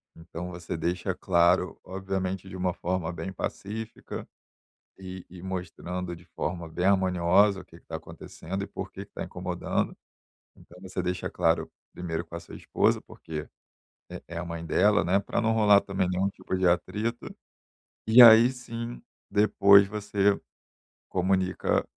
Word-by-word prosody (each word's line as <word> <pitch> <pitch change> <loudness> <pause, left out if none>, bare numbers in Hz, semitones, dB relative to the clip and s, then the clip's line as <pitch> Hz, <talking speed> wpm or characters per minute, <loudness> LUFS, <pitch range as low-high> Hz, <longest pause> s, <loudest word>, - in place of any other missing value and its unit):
Então 85 +1 -7
você 85 -1 -5
deixa 90 +3 -2
claro, 90 0 +2
obviamente, 95 0 -3
de 95 - -9
uma 90 -1 -1
forma 90 -1 -2
bem 85 +2 -6
pacífica 110 +4 -6 0.7
e 95 -1 -8
e 90 -1 -11
mostrando 90 -1 -5
de 85 +1 -15
forma 85 0 -4
bem 90 +3 -3
harmoniosa 95 +1 +3
o - - -11
que - - -17
que - - -36
tá - - -4
acontecendo, 95 +4 -7
e - - -9
por - - -7
que - - -8
que - - -41
tá - - -5
incomodando. - - -3 0.6
Então 90 - -16
você 95 -1 -4
deixa 90 0 -2
claro 80 0 +1 0.2
primeiro 85 -1 -4
com 85 - -13
a 85 - -4
sua - - -11
esposa, - - +1
porque 75 -2 -7 0.6
é - - -8
é 85 +1 -5
a 85 - -4
mãe 85 -1 -6
dela, 105 +5 +3
né, 95 +3 +3
pra 100 - -2
não 115 -1 +2
rolar 105 -2 +6
também 95 -2 -1
nenhum 90 +2 +1
tipo 95 -1 -4
de 95 - +1
atrito, 105 +7 -1 0.8
e 115 +3 +8
aí 115 +1 +9
sim, 120 -2 -7 0.3
depois 100 -1 +6
você 100 -1 +1 0.7
comunica 95 0 +1
95 Hz, 160 wpm, -27 LUFS, 85-100 Hz, 0.8 s, aí